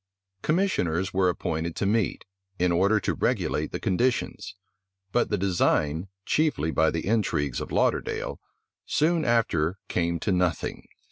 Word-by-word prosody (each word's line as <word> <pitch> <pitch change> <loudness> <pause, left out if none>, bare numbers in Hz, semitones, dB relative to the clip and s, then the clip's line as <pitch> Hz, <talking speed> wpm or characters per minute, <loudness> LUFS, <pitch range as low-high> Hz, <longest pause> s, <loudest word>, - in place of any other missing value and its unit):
Commissioners 100 - 0
were 95 -1 +3
appointed 80 -1 -2
to - - -1
meet, 105 +1 0 0.3
in 90 0 +2
order 100 +5 +3
to - - -1
regulate - - 0
the - - -3
conditions: 120 +4 -1 0.6
but 120 - +1
the 105 - +1
design, 85 -3 +1 0.2
chiefly 150 - +1
by 80 0 +3
the 85 - -3
intrigues 90 - 0
of - - -6
Lauderdale, - - 0 0.5
soon 165 +1 +2
after 105 - +1
came 85 -1 0
to 100 - -1
nothing. 90 -3 -1
95 Hz, 135 wpm, -26 LUFS, 85-115 Hz, 0.6 s, were